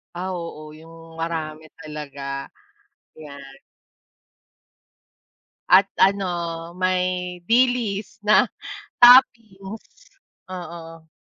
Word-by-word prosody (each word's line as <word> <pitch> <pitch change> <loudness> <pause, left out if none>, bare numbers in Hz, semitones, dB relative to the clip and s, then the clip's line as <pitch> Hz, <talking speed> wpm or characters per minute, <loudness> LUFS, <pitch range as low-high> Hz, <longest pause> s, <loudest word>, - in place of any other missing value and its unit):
Ah, 185 +1 -4
oo, 155 -3 -8
yung 165 +1 -15
marami 160 -1 -5
talaga, 140 -3 -7 0.7
yan. 140 -3 -12 2.1
At 185 +2 +7 0.2
ano, 175 -4 0
may 180 0 -1
dilis 230 -3 +1
na 210 - +5 0.5
toppings, 230 - +3 0.4
oo. 165 -2 -9
175 Hz, 70 wpm, -22 LUFS, 160-195 Hz, 2.1 s, At